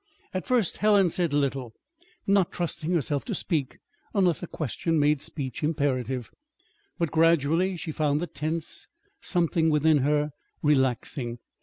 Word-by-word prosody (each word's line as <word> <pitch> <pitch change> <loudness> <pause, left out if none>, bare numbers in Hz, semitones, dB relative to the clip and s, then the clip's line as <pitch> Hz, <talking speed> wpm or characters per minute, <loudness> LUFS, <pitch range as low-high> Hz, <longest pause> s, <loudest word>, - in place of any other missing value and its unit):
At 185 - -3
first 245 -8 +2
Helen 205 -4 +4
said 170 -3 0
little, 135 -4 -1 0.5
not 195 -3 +3
trusting 170 -1 -3
herself 150 -4 0
to - - -2
speak 150 -7 -1 0.4
unless 180 -5 +3
a 175 - -5
question 160 +3 -2
made 150 -1 +3
speech 130 -5 -5
imperative; 130 -5 -1 0.7
but 170 -4 -1
gradually 165 +3 +3
she 160 0 -5
found 150 -1 +1
the 175 - -1
tense 160 0 -4 0.3
something 170 -2 +1
within 155 0 +4
her 150 +2 +1 0.3
relaxing. 130 -3 +1
155 Hz, 135 wpm, -27 LUFS, 140-170 Hz, 0.7 s, Helen